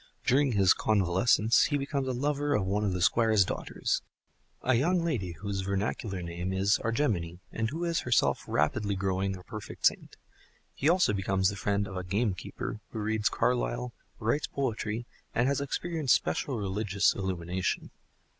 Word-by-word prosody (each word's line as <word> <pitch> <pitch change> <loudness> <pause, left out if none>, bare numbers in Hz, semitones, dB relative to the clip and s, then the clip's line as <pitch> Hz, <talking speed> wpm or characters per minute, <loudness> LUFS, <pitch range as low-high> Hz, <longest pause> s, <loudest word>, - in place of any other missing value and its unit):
During 135 0 +3
his 95 -3 +5
convalescence 105 +3 +3
he 145 - +1
becomes 140 -1 -2
a - - 0
lover 145 +2 0
of 95 - +1
one 100 +3 0
of 100 - +1
the 90 -1 -1
Squire's 110 -1 +4
daughters—a 130 - -4
young 170 +8 +2
lady 105 - -1
whose 100 +2 -4
vernacular 100 -1 -2
name 85 +2 -4
is 95 +2 +2
Argemone, 110 - 0
and 115 0 -1
who 165 +4 -4
is 170 -1 +1
herself 120 -2 +2
rapidly 100 +8 +1
growing 95 0 -1
a 90 - -13
perfect 110 +1 -7
saint. - - +1 0.6
He 145 - +1
also 180 - +4
becomes 95 -1 +1
the 100 - -5
friend 100 +1 0
of 95 - -6
a 90 - -3
gamekeeper 100 +1 -2
who - - -8
reads 110 -1 +1
Carlyle, - - 0 0.2
writes 115 +8 0
poetry, 115 -4 -2 0.3
and 120 +2 +3
has 140 0 +1
experienced 155 0 +1
special 135 -4 -1
religious 100 0 +1
illumination. 90 -1 -2
105 Hz, 155 wpm, -29 LUFS, 95-125 Hz, 0.6 s, his